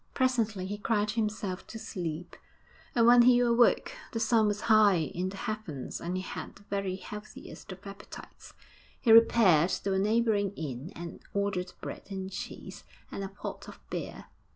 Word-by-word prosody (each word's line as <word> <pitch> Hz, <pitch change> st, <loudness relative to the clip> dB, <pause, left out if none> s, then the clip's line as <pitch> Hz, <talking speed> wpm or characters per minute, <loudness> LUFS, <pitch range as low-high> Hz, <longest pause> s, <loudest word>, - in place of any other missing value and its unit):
Presently 230 Hz, -7 st, +1 dB
he 205 Hz, +2 st, -5 dB
cried 210 Hz, -1 st, +1 dB
himself 210 Hz, -4 st, -2 dB
to 225 Hz, -, -8 dB
sleep, 175 Hz, -6 st, -5 dB, 0.6 s
and 230 Hz, -1 st, +5 dB
when 240 Hz, +1 st, +8 dB
he 245 Hz, 0 st, +6 dB
awoke 240 Hz, -, +3 dB, 0.2 s
the 225 Hz, -, -1 dB
sun 220 Hz, -1 st, +3 dB
was 205 Hz, 0 st, -1 dB
high 215 Hz, -3 st, +5 dB
in 170 Hz, +3 st, -2 dB
the 195 Hz, -, -8 dB
heavens 195 Hz, -12 st, -5 dB
and 175 Hz, +2 st, -2 dB
he 185 Hz, -, -3 dB
had -, -, -7 dB
the 200 Hz, -, -17 dB
very 195 Hz, -2 st, -2 dB
healthiest 210 Hz, +1 st, -10 dB
of 190 Hz, +2 st, -11 dB
appetites. 195 Hz, 0 st, -11 dB, 0.4 s
He 235 Hz, -, +3 dB
repaired 215 Hz, -7 st, +6 dB
to 195 Hz, 0 st, -1 dB
a 190 Hz, -, +2 dB
neighbouring 210 Hz, -1 st, +2 dB
inn 145 Hz, +1 st, -5 dB
and 170 Hz, 0 st, -7 dB, 0.2 s
ordered 200 Hz, -3 st, -1 dB
bread -, -, -7 dB
and 190 Hz, -1 st, -5 dB
cheese -, -, -7 dB, 0.3 s
and 195 Hz, -, -4 dB
a -, -, -3 dB
pot 195 Hz, -, -7 dB
of -, -, -11 dB
beer. -, -, -5 dB
200 Hz, 170 wpm, -30 LUFS, 185-225 Hz, 0.6 s, when